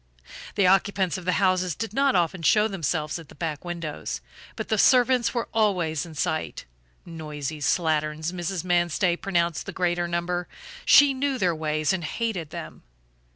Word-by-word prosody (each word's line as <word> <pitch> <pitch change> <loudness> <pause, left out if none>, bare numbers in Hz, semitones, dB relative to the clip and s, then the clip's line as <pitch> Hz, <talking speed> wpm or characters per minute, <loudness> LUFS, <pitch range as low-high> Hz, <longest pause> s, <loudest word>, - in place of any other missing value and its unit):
The 200 - +3
occupants 190 -1 +2
of 175 - -12
the 180 - +1
houses 185 -3 +1
did 225 -2 -5
not 275 0 +2
often 175 0 +1
show 210 +7 +4
themselves 165 -5 -2
at 160 -4 -13
the - - -14
back 155 -4 -4
windows, 170 - -5 0.4
but - - -5
the 220 - +1
servants 250 0 +4
were 235 - -1
always 180 -8 +1
in 160 - -11
sight. 155 +2 -2 0.4
Noisy 155 -3 -6
slatterns, 155 0 0
Mrs. 175 0 -3
Manstey 175 0 +1
pronounced 170 -3 -1
the - - -4
greater 175 -1 0
number; 175 +1 -2 0.4
she 285 0 +7
knew 270 0 -1
their 180 -7 +1
ways 155 0 0
and 180 -2 -2
hated 185 -2 -3
them. - - -8
175 Hz, 160 wpm, -25 LUFS, 160-195 Hz, 0.4 s, she